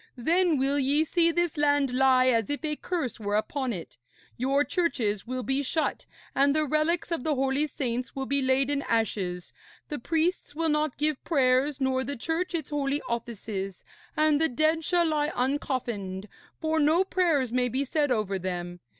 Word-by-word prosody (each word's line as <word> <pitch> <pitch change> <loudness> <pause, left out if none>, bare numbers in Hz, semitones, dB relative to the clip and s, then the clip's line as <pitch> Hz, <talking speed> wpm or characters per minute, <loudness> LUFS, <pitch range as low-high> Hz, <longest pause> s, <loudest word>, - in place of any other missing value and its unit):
Then 335 +5 +2
will 275 +2 +1
ye 285 +3 +2
see 335 +1 +2
this 345 -1 0
land 285 -3 +2
lie 255 0 +4
as 230 -4 +2
if 290 +2 -2
a 300 -1 -1
curse 295 - -3
were 205 -1 -2
upon 260 +4 -1
it. 175 - -7 0.4
Your 275 +4 +2
churches 235 - -1
will 255 0 -3
be 270 +2 0
shut, 310 +3 -2 0.3
and 280 +1 +3
the 310 0 +3
relics 310 +4 0
of 330 -7 -1
the 305 -2 +1
holy 270 +3 +1
saints 250 -3 -3
will 270 -1 -3
be 280 +1 0
laid 265 +1 +2
in 285 -1 0
ashes, 195 -6 -1 0.4
the 295 - -4
priests 325 +2 -1
will 325 +1 0
not 300 -2 0
give 300 -1 0
prayers 270 -1 +2
nor 260 -1 +1
the 285 +1 -4
Church 330 +8 -2
its 315 -2 -4
holy 285 0 -1
offices; 215 -5 -5 0.3
and 305 -1 +3
the 320 - +3
dead 310 +5 +1
shall 345 +1 +2
lie 300 -2 +1
uncoffined, 240 -7 -2 0.3
for 320 0 0
no 315 +5 +4
prayers 325 -10 +1
may 250 0 +2
be 265 +4 -1
said 290 0 0
over 205 -5 0
them. 175 -1 -4
275 Hz, 180 wpm, -27 LUFS, 245-310 Hz, 0.4 s, lie